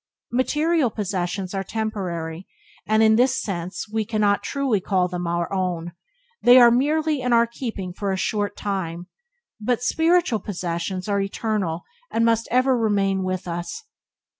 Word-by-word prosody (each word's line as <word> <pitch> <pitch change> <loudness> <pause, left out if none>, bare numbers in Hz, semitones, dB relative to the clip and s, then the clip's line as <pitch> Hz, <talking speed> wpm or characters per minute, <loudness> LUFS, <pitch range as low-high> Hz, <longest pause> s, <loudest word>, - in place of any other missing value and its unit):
Material 300 +3 +2
possessions 190 -2 -3
are 195 0 -2
temporary, 185 -6 -4 0.4
and 215 +1 +4
in 220 0 +5
this 260 +2 +3
sense 180 -2 -4
we 220 +1 -1
cannot 210 -2 +1
truly 270 -8 0
call 185 -1 +1
them 180 -1 -4
our 170 +2 -1
own 175 -3 -2 0.3
— 480 -1 -41
they 245 +1 +8
are 240 -1 +8
merely 300 +3 +1
in 250 0 -1
our 235 0 +5
keeping 225 -6 -5
for 200 +1 -2
a 190 - -1
short 205 +1 -1
time 180 -4 -3 0.3
— 480 - -36
but 245 +2 0
spiritual 325 -3 +2
possessions 180 -1 -4
are 200 -1 +1
eternal 195 -4 -2 0.3
and 230 0 +1
must 230 0 +2
ever 255 +1 +3
remain 200 -4 +1
with 185 0 -3
us. 175 - -5
210 Hz, 160 wpm, -23 LUFS, 185-245 Hz, 0.4 s, they